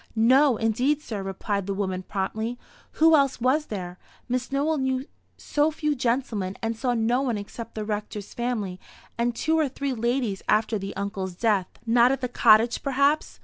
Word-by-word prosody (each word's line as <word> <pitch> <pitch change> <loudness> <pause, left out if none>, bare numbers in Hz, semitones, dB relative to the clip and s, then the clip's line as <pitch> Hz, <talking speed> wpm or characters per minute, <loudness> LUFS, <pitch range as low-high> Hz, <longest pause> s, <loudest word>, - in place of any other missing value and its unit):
"No, 255 +3 +5
indeed, 245 +7 +1
sir," 220 -9 -5
replied 195 +1 -3
the 200 - -2
woman, 190 -2 -2
promptly. 220 +5 -3 0.4
"Who 320 0 +5
else 275 -4 +2
was 265 +5 +1
there? 180 -3 -6 0.3
Miss 250 +1 -2
Nowell 290 +3 +1
knew 260 0 -1 0.3
so 295 +1 +1
few 300 -1 -1
gentlemen, 235 -7 -1
and 225 0 -2
saw 245 +1 -1
no 235 +3 +1
one 245 -5 -1
except 225 +3 -8
the 215 -1 -3
Rector's 210 -1 -5
family 220 -7 -3 0.4
and 235 0 0
two 320 +5 +1
or 300 -3 +2
three 275 +1 -3
ladies 235 -3 -1
after 215 0 +2
the 195 0 -6
uncle's 195 -2 -4
death." 200 -2 +1 0.2
"Not 235 +2 +5
at 270 - -1
the 250 - -2
cottage, 230 0 +4
perhaps. 280 +2 +1
235 Hz, 175 wpm, -25 LUFS, 205-265 Hz, 0.4 s, No